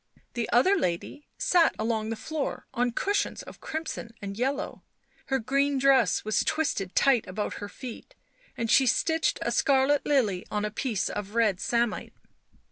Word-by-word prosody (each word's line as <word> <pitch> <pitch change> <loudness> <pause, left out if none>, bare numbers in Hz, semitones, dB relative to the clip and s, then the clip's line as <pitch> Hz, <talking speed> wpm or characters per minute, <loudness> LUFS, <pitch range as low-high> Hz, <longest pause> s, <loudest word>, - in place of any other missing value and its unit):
The 235 -2 -2
other 315 +12 +5
lady 235 - -3
sat 345 -3 +3
along 220 0 -1
the 225 - -2
floor 305 +5 -4
on 245 +1 +1
cushions 400 - -1
of - - -13
crimson 310 -7 -5
and 200 -1 -6
yellow; 270 +6 -2 0.5
her 270 - +1
green 275 +3 +1
dress 265 -8 +3
was 215 - +1
twisted 205 - -1
tight 265 -5 +3
about 205 +3 -3
her 205 - -5
feet 255 - -9 0.4
and 230 0 -1
she 265 +1 +5
stitched 320 +6 +2
a - - -1
scarlet 280 0 +3
lily 220 -11 +1
on 210 0 -1
a 210 - -3
piece 225 -2 -1
of 205 +1 -5
red 215 -5 +2
samite. 235 -1 -1
240 Hz, 160 wpm, -27 LUFS, 215-280 Hz, 0.5 s, other